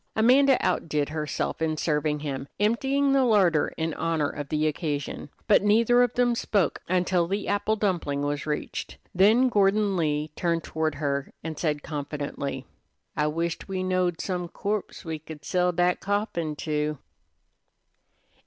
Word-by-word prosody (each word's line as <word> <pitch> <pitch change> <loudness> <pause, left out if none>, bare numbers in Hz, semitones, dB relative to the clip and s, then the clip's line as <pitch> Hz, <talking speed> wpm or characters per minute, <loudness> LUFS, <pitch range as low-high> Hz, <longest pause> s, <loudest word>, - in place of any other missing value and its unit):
Amanda 260 +4 +5
outdid 150 -2 0
herself 155 +1 -3
in 155 -1 0
serving 150 -1 0
him, 140 -2 -4
emptying 270 +6 +2
the 270 -1 +4
larder 190 -10 +3
in 160 0 -1
honor 160 -3 0
of 145 -2 -6
the 155 0 0
occasion; 150 -2 -3 0.2
but 215 - +5
neither 230 +4 +4
of 245 -2 +3
them 245 -1 +3
spoke 200 -7 0
until 180 -1 +1
the 200 +3 -2
apple 205 +2 +1
dumpling 175 -9 -1
was 145 +1 -2
reached. 150 - -4 0.2
Then 215 +8 +5
Gordon 205 -2 +2
Lee 150 -2 0
turned 170 -2 0
toward 155 -1 -2
her 140 -1 -2
and 160 -1 -5
said 150 -3 -1
confidentially: 140 -2 -4 0.5
"I 150 0 +1
wished 165 +2 -2
we 190 -1 -2
knowed 185 -2 0
some 180 -2 -2
corpse 205 +3 -4
we 160 -1 -4
could 150 -1 -11
sell 180 0 +2
dat 175 +1 +1
coffin 195 -6 -2
to." 150 0 -2
170 Hz, 150 wpm, -26 LUFS, 150-205 Hz, 0.5 s, Amanda